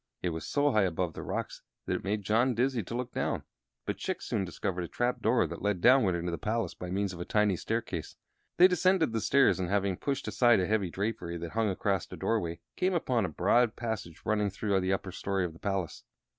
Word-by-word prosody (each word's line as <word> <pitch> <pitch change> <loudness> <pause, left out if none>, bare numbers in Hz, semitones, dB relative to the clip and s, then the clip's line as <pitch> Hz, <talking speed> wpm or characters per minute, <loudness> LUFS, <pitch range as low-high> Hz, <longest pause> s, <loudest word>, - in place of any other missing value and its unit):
It 90 - +1
was 80 -1 -5
so 145 0 +2
high 110 - +3
above 90 -1 -1
the - - -7
rocks - - -4 0.2
that - - -1
it - - -3
made 105 +1 -1
John 115 +5 +2
dizzy 125 0 +1
to 110 +4 -6
look 125 0 -3
down; - - -1 0.4
but - - -2
Chick - - -3
soon 95 - -1
discovered 90 +1 -3
a - - -4
trap 120 +6 -1
door 115 +3 +3
that - - -7
led 105 -3 0
downward 120 -5 +5
into 85 0 -2
the 85 - -4
palace 115 +2 -1
by 90 - -7
means 95 +1 -1
of 85 - -9
a - - -1
tiny 105 0 +2
staircase. 110 -5 -3 0.4
They 180 - +9
descended 180 -6 +2
the 110 - 0
stairs, 140 -4 +4
and, 90 -2 -2
having 100 -2 +1
pushed 140 -1 -2
aside 120 -4 +4
a 90 - +1
heavy 105 -2 0
drapery 90 -3 -3
that 85 0 -6
hung 110 -1 +1
across 95 0 -1
a - - -7
doorway, 85 -7 -1
came 185 0 +1
upon 125 - +1
a - - -3
broad 110 +9 +2
passage 110 -8 -5
running 105 -1 +1
through 100 0 0
the 95 0 0
upper 95 -1 -2
story 95 0 -1
of 85 - -5
the 80 - -15
palace. 95 -5 -3
100 Hz, 230 wpm, -30 LUFS, 90-120 Hz, 0.4 s, They